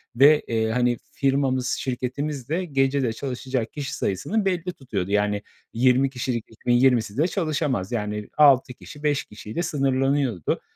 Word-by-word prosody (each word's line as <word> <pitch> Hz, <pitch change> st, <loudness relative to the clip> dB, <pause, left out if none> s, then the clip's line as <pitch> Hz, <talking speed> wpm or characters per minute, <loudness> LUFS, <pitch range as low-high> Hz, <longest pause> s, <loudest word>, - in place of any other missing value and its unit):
ve, 145 Hz, +4 st, +6 dB
eee, 110 Hz, -1 st, 0 dB
hani, 125 Hz, 0 st, +1 dB
firmamız, 135 Hz, -2 st, +1 dB
şirketimiz 130 Hz, +2 st, -3 dB
de 180 Hz, +3 st, -1 dB
gecede 135 Hz, -4 st, +1 dB
çalışacak 130 Hz, -2 st, -3 dB
kişi 145 Hz, -2 st, -4 dB
sayısını 195 Hz, -, -1 dB
belli 180 Hz, -1 st, -1 dB
tutuyordu. 100 Hz, -8 st, -4 dB
Yani, 105 Hz, 0 st, +1 dB, 0.3 s
20 130 Hz, +3 st, +3 dB
kişilik 125 Hz, -3 st, -3 dB
ekibin 120 Hz, +2 st, -1 dB
20'si 120 Hz, -3 st, +3 dB
de 160 Hz, +4 st, +3 dB
çalışamaz. 150 Hz, -, -1 dB
Yani, 105 Hz, -2 st, -3 dB
6 135 Hz, -4 st, +5 dB
kişi, 145 Hz, +4 st, -13 dB
5 145 Hz, -1 st, +1 dB
kişiyle 105 Hz, +10 st, -6 dB
sınırlanıyordu. 135 Hz, -, 0 dB
130 Hz, 140 wpm, -24 LUFS, 115-145 Hz, 0.3 s, ve